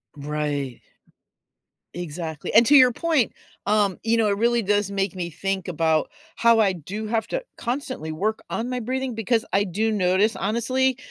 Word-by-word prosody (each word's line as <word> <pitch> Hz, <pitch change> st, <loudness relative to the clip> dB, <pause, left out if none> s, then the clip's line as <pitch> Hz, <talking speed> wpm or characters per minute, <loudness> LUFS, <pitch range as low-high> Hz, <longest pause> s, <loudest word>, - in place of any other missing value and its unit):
Right. 145 Hz, -3 st, -3 dB, 1.1 s
Exactly, 160 Hz, -2 st, -5 dB
and 230 Hz, +1 st, +7 dB
to 290 Hz, -, +6 dB
your 255 Hz, -2 st, +6 dB
point, 315 Hz, -7 st, +1 dB, 0.3 s
um, 205 Hz, -2 st, +2 dB
you 230 Hz, +1 st, +2 dB
know, 225 Hz, -2 st, +2 dB
it 200 Hz, -, 0 dB
really 235 Hz, +1 st, +2 dB
does 205 Hz, -1 st, +1 dB
make 195 Hz, -2 st, -1 dB
me 175 Hz, -2 st, -4 dB
think 195 Hz, +3 st, -3 dB
about 160 Hz, -2 st, +1 dB, 0.3 s
how 230 Hz, -1 st, +5 dB
I 200 Hz, -3 st, +3 dB
do 190 Hz, +6 st, -6 dB
have 225 Hz, 0 st, -1 dB
to -, -, -3 dB
constantly 245 Hz, -, -4 dB
work 215 Hz, +7 st, -1 dB
on 235 Hz, +2 st, -3 dB
my 250 Hz, 0 st, -2 dB
breathing 255 Hz, +2 st, -3 dB
because 225 Hz, +1 st, 0 dB
I 200 Hz, +1 st, +2 dB
do 215 Hz, +5 st, -1 dB
notice, 195 Hz, +1 st, +2 dB
honestly, 245 Hz, +5 st, 0 dB
210 Hz, 165 wpm, -24 LUFS, 180-235 Hz, 1.1 s, and